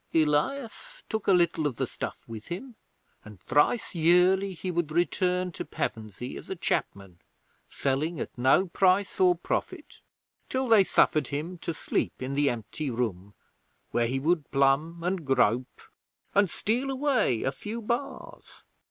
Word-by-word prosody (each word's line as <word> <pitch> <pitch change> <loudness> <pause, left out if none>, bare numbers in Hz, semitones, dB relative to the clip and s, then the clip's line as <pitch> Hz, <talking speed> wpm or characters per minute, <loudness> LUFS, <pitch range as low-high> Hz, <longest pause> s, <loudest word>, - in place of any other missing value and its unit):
'Elias 230 - 0
took 220 -2 -3
a - - +5
little 170 -4 +3
of 135 - -4
the - - -1
stuff - - -6
with 110 -1 -9
him, 240 +9 -6 0.5
and 105 -3 -13
thrice 150 - +1
yearly 180 +3 +3
he 180 +2 -4
would 170 -3 -1
return 180 +2 +1
to - - -6
Pevensey 110 +3 -5
as - - -11
a 190 - -3
chapman, 100 - -3 0.5
selling 145 +5 -1
at - - -5
no 130 +9 +4
price 190 +2 +2
or 180 -1 +5
profit, 170 - -4 0.5
till 260 0 -1
they 225 -4 +6
suffered 155 -6 +2
him 160 +5 -4
to 170 - -3
sleep 160 - -2
in 130 +1 -4
the 145 0 +2
empty 120 +5 -4
room, 105 -5 -3 0.6
where 120 -1 +1
he 130 +3 -1
would 160 +1 0
plumb 140 +5 +1
and 180 -1 -1
grope, 125 -2 +1 0.5
and 200 -2 +4
steal 240 +9 -1
away 260 - +1
a 135 - 0
few 215 +11 -6
bars. 235 +5 -5
165 Hz, 150 wpm, -27 LUFS, 135-190 Hz, 0.6 s, they